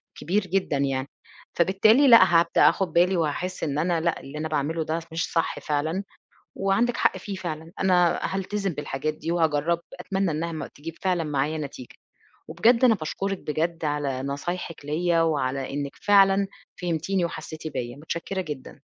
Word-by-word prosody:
كبير 195 Hz, +6 st, 0 dB
جدًا 185 Hz, -5 st, 0 dB
يعني، 135 Hz, -1 st, -1 dB, 0.5 s
فبالتالي 215 Hz, -, +4 dB
لأ، 230 Hz, -6 st, +9 dB, 0.2 s
هابدأ 170 Hz, -, +5 dB
آخُد 195 Hz, -, -1 dB
بالي 180 Hz, +2 st, +4 dB
وهاحس 170 Hz, +3 st, -2 dB
إن 145 Hz, -2 st, -1 dB
أنا 170 Hz, 0 st, +1 dB
لأ، 170 Hz, 0 st, 0 dB
اللي 140 Hz, +2 st, -9 dB
أنا 160 Hz, +1 st, -2 dB
باعمله 155 Hz, +2 st, -1 dB
ده 160 Hz, +2 st, -2 dB
س -, -, -11 dB
مش 165 Hz, +1 st, -2 dB
صح 165 Hz, -, 0 dB
فعلًا 155 Hz, +6 st, -1 dB, 0.5 s
وعندِك 210 Hz, +5 st, +1 dB
حق -, -, +2 dB
فيه 200 Hz, -, -6 dB
فعلًا، 165 Hz, -2 st, -6 dB
أنا 180 Hz, -3 st, +3 dB
هالتزِم 195 Hz, 0 st, -2 dB
بالحاجات 150 Hz, +1 st, -3 dB
دي 165 Hz, +2 st, -4 dB
وهاجرّب 165 Hz, 0 st, +1 dB, 0.2 s
أتمنى 190 Hz, 0 st, -1 dB
إنّها 165 Hz, +2 st, -2 dB
ما 160 Hz, -, -4 dB
تجيب 160 Hz, +3 st, -8 dB
فعلًا 180 Hz, -3 st, +1 dB
معايا 150 Hz, +1 st, -1 dB
نتيجة. 140 Hz, -4 st, -8 dB, 0.5 s
وبجد 230 Hz, +10 st, +3 dB
أنا 235 Hz, -, +6 dB
باشكُرِك 195 Hz, +2 st, -3 dB
بجد 165 Hz, +1 st, -2 dB
على 145 Hz, -3 st, -1 dB
نصايحِك 150 Hz, +3 st, -4 dB
ليّا 165 Hz, +3 st, +1 dB
وعلى 135 Hz, -4 st, -1 dB
إنِّك 140 Hz, 0 st, -4 dB
فعلًا 195 Hz, -1 st, +4 dB, 0.4 s
فهمتيني 175 Hz, +2 st, 0 dB
وحسّيتِ 160 Hz, -2 st, -6 dB
بيّا، 120 Hz, -3 st, -5 dB
مُتشكّرة 170 Hz, +5 st, -4 dB
جدًا. 150 Hz, -7 st, -7 dB
165 Hz, 160 wpm, -25 LUFS, 150-185 Hz, 0.5 s, لأ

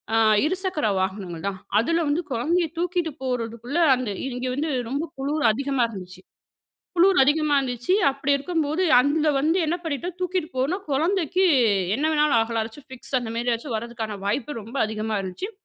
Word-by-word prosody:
ஆ -, -, +4 dB, 0.3 s
இருசக்கர 370 Hz, -, -1 dB
வாகனங்கள் 190 Hz, -3 st, -3 dB
தான். 195 Hz, -1 st, -3 dB, 0.2 s
அதில 335 Hz, +8 st, +1 dB
வந்து 300 Hz, +4 st, +1 dB
கொழந்தையை 325 Hz, +9 st, +1 dB
தூக்கிட்டு 350 Hz, -1 st, -1 dB
போறதுக்குள்ள 245 Hz, +4 st, -3 dB, 0.2 s
அந்த 250 Hz, -4 st, -3 dB, 0.2 s
இங்கே 250 Hz, +1 st, -4 dB
வந்து 300 Hz, +4 st, -1 dB, 0.2 s
ரொம்ப 280 Hz, +4 st, -1 dB
குளுர் 290 Hz, +3 st, -1 dB
அதிகமா 275 Hz, +1 st, 0 dB
இருந்துச்சு. 185 Hz, -3 st, -9 dB, 0.8 s
குளுர் 370 Hz, +2 st, +5 dB
அதிகமா 295 Hz, +1 st, +2 dB
இருந்துச்சு 250 Hz, +5 st, -1 dB, 0.2 s
அப்டி 275 Hz, +1 st, -2 dB
இருக்கும்போது, 320 Hz, +2 st, -1 dB, 0.2 s
அங்க 300 Hz, +3 st, +1 dB
வந்து 320 Hz, +6 st, +2 dB
என்ன 325 Hz, -, 0 dB
பண்ணிட்டோம் 335 Hz, +3 st, -4 dB
தூக்கிட்டு 365 Hz, -3 st, -2 dB
போனோம் 340 Hz, +10 st, -1 dB
குழந்தைக்கு 355 Hz, +5 st, +1 dB, 0.5 s
என்ன 290 Hz, -, -1 dB
வேணாலும் 300 Hz, -5 st, +3 dB
ஆகலா 225 Hz, 0 st, -1 dB
ஏதாச்சும் 230 Hz, +6 st, -11 dB
ஃபிக்ஸ் 260 Hz, +1 st, -3 dB
அந்த 235 Hz, -2 st, -6 dB
மாரி 240 Hz, +1 st, -1 dB
ஏதாச்சும் 235 Hz, +1 st, -3 dB
வரதுக்கான 225 Hz, -2 st, -5 dB
வாய்ப்பு 230 Hz, +5 st, -2 dB
ரொம்ப 230 Hz, +5 st, -11 dB
அதிகமா 215 Hz, 0 st, -3 dB
இருந்துச்சு. 190 Hz, -, -5 dB
275 Hz, 155 wpm, -24 LUFS, 230-325 Hz, 0.8 s, குளுர்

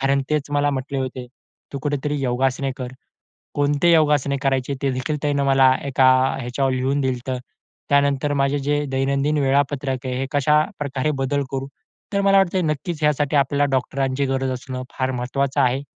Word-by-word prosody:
कारण 135 Hz, 0 st, +2 dB
तेच 150 Hz, -1 st, -1 dB
मला 145 Hz, 0 st, +2 dB
म्हटले 135 Hz, 0 st, -3 dB
होते, 130 Hz, -1 st, -4 dB, 0.5 s
“तू 140 Hz, -, -3 dB
कुठेतरी 145 Hz, 0 st, -1 dB
योगासने 130 Hz, +1 st, 0 dB
कर.” 125 Hz, -2 st, -6 dB, 0.6 s
कोणते 145 Hz, +4 st, +2 dB
योगासने 150 Hz, -3 st, +3 dB
करायचे 135 Hz, 0 st, 0 dB
ते 140 Hz, -, +1 dB
देखील 130 Hz, +4 st, -2 dB
त्यांनी 145 Hz, -1 st, +1 dB
मला 135 Hz, -1 st, +5 dB
एका 135 Hz, -1 st, +3 dB, 0.3 s
ह्याच्यावर 130 Hz, +2 st, -1 dB
लिहून 130 Hz, +2 st, 0 dB
दिलं 130 Hz, -1 st, +1 dB
होतं. 125 Hz, +1 st, -4 dB, 0.5 s
त्यानंतर 140 Hz, 0 st, +2 dB
माझे 140 Hz, +1 st, +1 dB
जे 145 Hz, +1 st, 0 dB
दैनंदिन 140 Hz, +3 st, 0 dB
वेळापत्रक 135 Hz, -1 st, 0 dB
आहे, 130 Hz, -, -2 dB
हे 135 Hz, -, -2 dB
कशा 150 Hz, +2 st, +3 dB, 0.2 s
प्रकारे 140 Hz, 0 st, -1 dB
बदल 140 Hz, +2 st, 0 dB
करू. 135 Hz, 0 st, -3 dB, 0.4 s
तर 200 Hz, -, +1 dB
मला 195 Hz, 0 st, +5 dB
वाटतंय, 190 Hz, -1 st, +2 dB
नक्कीच 155 Hz, +1 st, -3 dB
यासाठी 150 Hz, 0 st, +1 dB
आपल्याला 140 Hz, +1 st, +2 dB
डॉक्टरांची 135 Hz, +1 st, 0 dB
गरज 135 Hz, 0 st, -1 dB
असणं 130 Hz, 0 st, -5 dB
फार 130 Hz, 0 st, -1 dB
महत्त्वाचं 135 Hz, +3 st, -1 dB
आहे. 130 Hz, +1 st, +2 dB
140 Hz, 165 wpm, -22 LUFS, 130-145 Hz, 0.6 s, मला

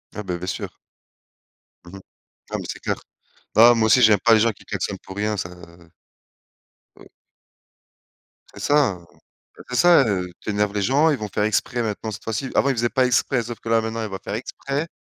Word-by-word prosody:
Ah 105 Hz, -, -5 dB
beh, 90 Hz, -3 st, -3 dB
bien 90 Hz, +1 st, -7 dB
sûr. -, -, -4 dB, 1.2 s
Mmh 90 Hz, +2 st, -12 dB
mh, -, -, -9 dB, 0.5 s
ah, -, -, -1 dB
mais -, -, -7 dB
c'est -, -, -9 dB
clair. -, -, -2 dB, 0.6 s
Bah, 115 Hz, +3 st, +8 dB
moi 110 Hz, -1 st, +2 dB
aussi, 125 Hz, +3 st, +5 dB
j'aime 110 Hz, -4 st, +6 dB
pas 115 Hz, -, +6 dB
les 110 Hz, -, +5 dB
gens 115 Hz, +1 st, +3 dB
qui 105 Hz, -, -18 dB
klaxonnent -, -, -4 dB
pour 95 Hz, -, -11 dB
rien, 105 Hz, 0 st, -1 dB
ça 85 Hz, -, -4 dB, 1.5 s
heu -, -, -17 dB, 1.5 s
C'est -, -, -9 dB
ça, 145 Hz, -9 st, +3 dB
beh, 85 Hz, -1 st, -20 dB, 0.5 s
c'est -, -, -2 dB
ça, 140 Hz, 0 st, +5 dB
heu, 90 Hz, -4 st, -1 dB
tu -, -, -7 dB
énerves 105 Hz, 0 st, 0 dB
les 105 Hz, -, -1 dB
gens, 140 Hz, +10 st, +3 dB
ils 145 Hz, -, +1 dB
vont 105 Hz, -, -5 dB
faire 105 Hz, +1 st, -2 dB
exprès 120 Hz, +3 st, 0 dB
maintenant 110 Hz, 0 st, -3 dB
cette 105 Hz, -, -9 dB
fois-ci. 115 Hz, +4 st, -3 dB
Avant, 140 Hz, -, +3 dB
ils 135 Hz, -, +1 dB
faisaient 120 Hz, 0 st, +1 dB
pas 130 Hz, +1 st, +2 dB
exprès, 125 Hz, 0 st, +1 dB
sauf 120 Hz, 0 st, -7 dB
que -, -, -12 dB
là, 115 Hz, 0 st, +3 dB
maintenant, 110 Hz, +1 st, -4 dB
ils 110 Hz, -, -4 dB
vont 95 Hz, -1 st, -6 dB
faire 105 Hz, -, -4 dB
exprès. 140 Hz, +5 st, -4 dB
110 Hz, 210 wpm, -22 LUFS, 105-125 Hz, 1.5 s, Bah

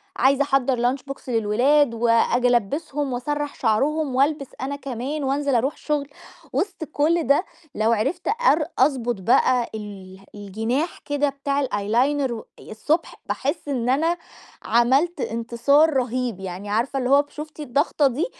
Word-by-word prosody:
عايزة 275 Hz, +2 st, +3 dB
احضّر 260 Hz, -2 st, +1 dB
lunch -, -, -11 dB
box 275 Hz, -, -9 dB
للولاد 240 Hz, +5 st, +3 dB
وآجي 235 Hz, +1 st, +2 dB
ألبّسهم 265 Hz, +4 st, 0 dB
وأسرّح 290 Hz, +4 st, -3 dB
شَعرهم 270 Hz, +5 st, 0 dB
والبس 280 Hz, +1 st, +1 dB
أنا 275 Hz, +2 st, -3 dB
كمان 275 Hz, +2 st, -4 dB
وانزل 275 Hz, 0 st, 0 dB
اروح 260 Hz, +5 st, +1 dB
الشُغل 295 Hz, -2 st, -2 dB, 0.5 s
وسط 380 Hz, -4 st, -2 dB
كل 315 Hz, +1 st, 0 dB
ده 285 Hz, +7 st, +3 dB, 0.3 s
لو 220 Hz, +2 st, +2 dB
عرفت 270 Hz, +11 st, -1 dB
أر 425 Hz, -10 st, +3 dB
أضبط 245 Hz, -6 st, +1 dB
بقى 245 Hz, +3 st, +3 dB
اله 195 Hz, -3 st, -9 dB
الجناح 225 Hz, -, -3 dB
كده 290 Hz, 0 st, +1 dB
بتاع 280 Hz, 0 st, -2 dB
الeyeliner 250 Hz, +6 st, 0 dB
و 225 Hz, -, -5 dB, 0.2 s
ي -, -, -12 dB
الصبح 300 Hz, +10 st, -1 dB
باحس 320 Hz, -, -3 dB
إن 250 Hz, -4 st, -1 dB
أنا 325 Hz, +6 st, +2 dB, 0.5 s
عملت 265 Hz, +9 st, +2 dB
إنتصار 235 Hz, +7 st, +2 dB
رهيب، 250 Hz, -4 st, -1 dB
يعني 190 Hz, +2 st, -6 dB
عارفة 240 Hz, +6 st, 0 dB
اللي 250 Hz, -1 st, -1 dB
هو 280 Hz, +1 st, +6 dB
ب 290 Hz, -, -15 dB
شُفتِ 305 Hz, +1 st, -9 dB
الضغطة 285 Hz, +1 st, +1 dB
دي 280 Hz, +9 st, -1 dB
265 Hz, 145 wpm, -23 LUFS, 235-290 Hz, 0.5 s, هو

